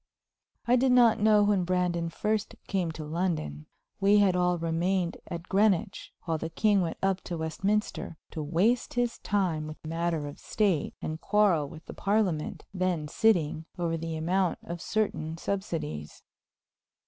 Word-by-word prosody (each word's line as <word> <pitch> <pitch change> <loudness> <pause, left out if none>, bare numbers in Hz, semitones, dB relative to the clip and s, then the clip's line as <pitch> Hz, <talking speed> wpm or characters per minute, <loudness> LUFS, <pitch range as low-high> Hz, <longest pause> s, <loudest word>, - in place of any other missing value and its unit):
I 245 +1 +5
did 260 +1 +3
not 235 -3 +6
know 210 0 +5
when 205 -3 +2
Brandon 175 -2 0
first 210 +5 -1
came 185 -4 0
to 155 - -6
London. 155 - -2 0.3
We 200 +1 +5
had 200 -3 +4
all 180 0 +2
remained 170 +2 0
at 170 -1 -5
Greenwich 195 -3 +1
while 165 -2 -1
the 160 - -4
king 205 +2 +3
went 165 -2 -2
up 195 -1 +1
to 175 - -4
Westminster 190 +2 -2
to 160 - -4
waste 185 +14 +1
his 245 -1 0
time 175 -7 0
with 155 - -8
matters 165 -1 -1
of 145 - -8
state 195 -9 0
and 155 +1 -4
quarrel 185 -9 +3
with 160 +2 -12
the - - -8
Parliament, 195 -6 0
then 180 -5 -1
sitting, 160 -5 +2
over 170 -2 0
the 165 0 -4
amount 175 +2 +1
of 170 0 -6
certain 165 -7 -1
subsidies. 165 - -4
180 Hz, 155 wpm, -28 LUFS, 160-205 Hz, 0.3 s, not